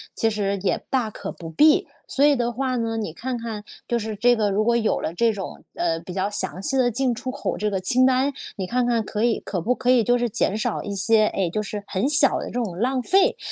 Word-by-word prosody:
其 225 - +1
实 200 -2 -1
也 - - 0
大 250 -5 0
可 - - -6
不 165 -1 -9
必。 300 - +4 0.2
所 280 - +2
以 290 -1 +5
的 240 -1 -1
话 255 +2 -2
呢， 230 -1 -2
你 205 -8 -4
看 250 +5 -4
看 225 -3 -6 0.2
就 235 -1 0
是 215 -1 -4
这 245 +3 +3
个 210 -2 +1
如 205 +2 +1
果 235 +1 +2
有 225 -2 +1
了 160 - -3
这 230 +5 +2
种， 195 -3 -7
呃， 165 -1 -1
比 175 +2 -10
较 190 +2 -1
详 190 -3 +1
细 270 +6 -1
的 255 -2 +3
进 245 +1 0
出 255 +2 -6
口 - - -3
这 210 0 -1
个 195 -2 -2
清 245 +8 +2
单， 260 +2 +2 0.2
你 190 - -4
看 245 +5 0
看 230 -2 +1
可 215 +1 -3
以 235 -1 +2
可 180 -4 -4
不 250 +8 0
可 250 0 +1
以 240 -3 +4
就 245 +1 +2
是 240 0 0
减 205 -1 0
少 - - -2
一 200 -1 -5
些， 215 +2 +3
哎， 190 -3 -1
就 210 - -1
是 205 0 -6
很 205 +9 -1
小 285 -2 +5
的 - - -5
这 - - -9
种 230 -7 -2
浪 255 +2 0
费。 385 - +3
225 Hz, 280 characters per minute, -23 LUFS, 200-250 Hz, 0.2 s, 以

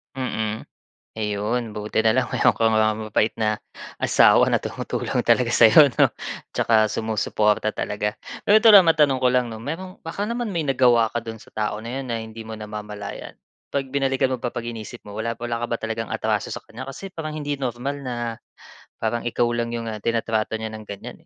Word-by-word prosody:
Mm, 110 -4 -3 0.5
ayun 105 +2 -2
buti 105 +1 -2
na 110 0 +3
lang 130 -1 0
meron - - +3
kang, 115 -1 +2
ah, 110 0 +3
mabait 110 0 0
na, 110 -1 0 0.4
asawa - - +5
na - - +3
tumutulong - - -2
talaga - - +3
sa'yo 140 +6 +7
'no, - - +7 0.5
tsaka 110 -1 +4
sumusuporta 110 0 0
talaga. 105 0 -2 0.3
Pero 205 - +6
ito 220 +1 +7
lang, 195 -4 +9
matanong 150 -5 +4
ko 130 - +3
lang 125 -1 +1
'no, 110 - -7
merong 170 +9 -6
baka 165 +5 -4
naman 235 +2 -2
may 170 -6 -2
nagawa 125 -5 +3
ka 120 - -1
do'n 110 -1 -9
sa - - -20
tao 105 0 -3
na 120 +4 -4
'yon 135 - -5
na 120 - -2
hindi 110 0 -9
mo 110 - -6
namamalayan? 105 -1 -7 0.3
'Pag 135 -2 -3
binalikan 135 -1 +1
mo 130 - -2
ba, 120 - -2
'pag 120 -1 -5
iniisip 115 0 -7
mo, 105 - -11
wala, 110 +3 -3
wala 120 0 -3
ka 120 - -1
ba 115 - -1
talagang 115 0 -3
atraso - - -1
sa - - -8
kanya? 130 +4 -9
Kasi 185 +8 -8
parang 155 -3 -5
hindi 145 -2 -3
normal 130 +2 -3
na 130 -3 -5 0.9
parang 115 +1 -1
ikaw 120 0 +1
lang 120 0 -2
yung, 115 -1 -3
ah, 110 - -4
tinatrato 110 0 -1
niya 110 - -3
ng 110 0 -9
ganyan, 100 -1 -9
115 Hz, 200 wpm, -23 LUFS, 110-130 Hz, 0.9 s, lang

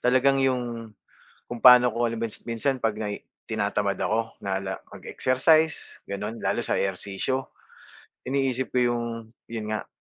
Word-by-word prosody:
talagang 130 +2 +3
'yong, 120 -3 -1 0.6
kung 120 - -4
pano 125 -1 +8
ko 120 +1 0
halim 115 0 -3
s - - -4
minsan 125 +4 -1
'pag 115 -3 0
nai 105 -1 -4 0.3
tina-tamad 100 -2 0
ako 115 +1 -1
na 95 -1 -2
la 95 0 -3 0.2
mag-exercise 155 +5 +1
ganun, 105 +3 -4
lalo - - 0
sa - - 0
ehersisyo. 100 +7 -2 0.8
Iniisip 130 -1 -1
ko - - +4
'yong, 120 0 -1 0.4
'yon 115 -2 -5
nga, 110 - -3
120 Hz, 145 wpm, -26 LUFS, 105-130 Hz, 0.8 s, pano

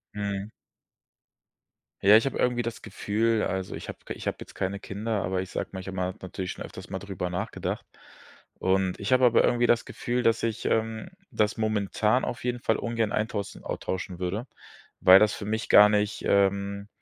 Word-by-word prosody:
Mhm. 100 0 -3 1.5
Ja, 100 +2 +8
ich 115 - +1
habe 135 - -2
irgendwie 125 -1 +1
das 115 -2 -5
Gefühl, 110 +1 0
also 95 0 -2
ich - - -7
habe - - -7
ich - - -5
habe - - 0
jetzt - - -10
keine 95 +1 -3
Kinder, 105 +1 -3
aber 90 0 -1
ich 95 - -7
sage - - -3
mich 95 -1 -7
immer 95 -1 -2
habe 95 - -6
mal - - -34
natürlich 90 0 -4
schon - - -7
öfters - - -10
mal 95 0 -4
drüber 95 -3 -4
nachgedacht. 90 - -4 0.7
Und 95 -1 0
ich 100 +5 0
habe 130 0 +5
aber 120 -1 +5
irgendwie 120 0 +3
das 120 - +3
Gefühl, 120 +1 -2
dass 115 -2 +2
ich 115 -2 -2
ähm, 110 0 -1 0.2
das 105 0 +1
momentan 110 +2 +1
auf - - -5
jeden 125 0 -1
Fall 110 - +1
ungern 115 -3 -1
eintaussen 105 -2 -3
austauschen 90 -1 -4
würde, 95 +6 -2 0.5
weil 95 +1 +8
das 105 0 +3
für 100 - -6
mich 110 +2 -2
gar 105 - +9
nicht 105 0 0
ähm, 100 0 +1
105 Hz, 190 wpm, -27 LUFS, 95-115 Hz, 1.5 s, gar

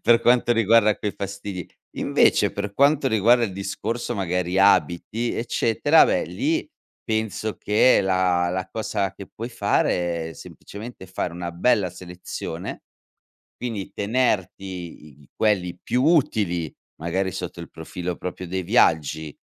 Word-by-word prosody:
per 115 0 +5
quanto 120 0 +4
riguarda 115 -1 +4
quei 105 - -2
fastidi. 100 -2 -5 0.3
Invece, - - +3
per 100 0 -4
quanto 140 +1 +3
riguarda 115 +2 +4
il 100 - -4
discorso, 110 +5 -3
magari, 90 -2 -1
abiti, 100 +4 +2
eccetera, 120 +6 +3
beh, - - +1
lì, 315 +3 -1 0.4
penso 110 -1 -2
che 105 +5 +4
la 90 -2 +2
la 95 +1 -3
cosa 100 -3 -2
che 100 - -10
puoi 115 +2 -7
fare 85 -7 0
è, - - -9
semplicemente, 105 +5 -10
fare 90 -1 -3
una 85 0 -5
bella 100 +2 +2
selezione, 90 0 -7 0.8
quindi, 115 -6 -5
tenerti 105 -4 0 0.4
i 75 -1 -18
i - - -22
quelli 95 -5 +1
più 125 - 0
utili, 105 - +1 0.3
magari, 95 +3 -1
sotto 90 -2 -6
il 85 - -9
profilo 85 +2 -5
proprio 90 0 -6
dei 95 +1 -3
viaggi, 80 - +2
100 Hz, 135 wpm, -23 LUFS, 90-115 Hz, 0.8 s, per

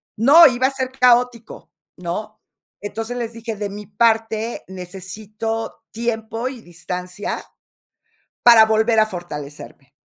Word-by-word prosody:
¡No!, 290 +9 +8
iba 260 0 +2
a - - -2
ser 260 -1 -3
caótico, 245 -2 +1 0.3
¿no? 210 +5 -5 0.4
Entonces, 225 +4 -5
les 235 -1 -4
dije: 230 -1 -6
"De 205 0 -4
mi 205 +1 -9
parte 225 +1 0
necesito 200 +5 -6
tiempo 225 +1 -3
y 260 -3 -7
distancia 180 +2 -6 1.0
para 235 -2 +8
volver 220 +1 +3
a 215 - +4
fortalecerme". 150 -7 -9
220 Hz, 120 wpm, -20 LUFS, 200-235 Hz, 1.0 s, No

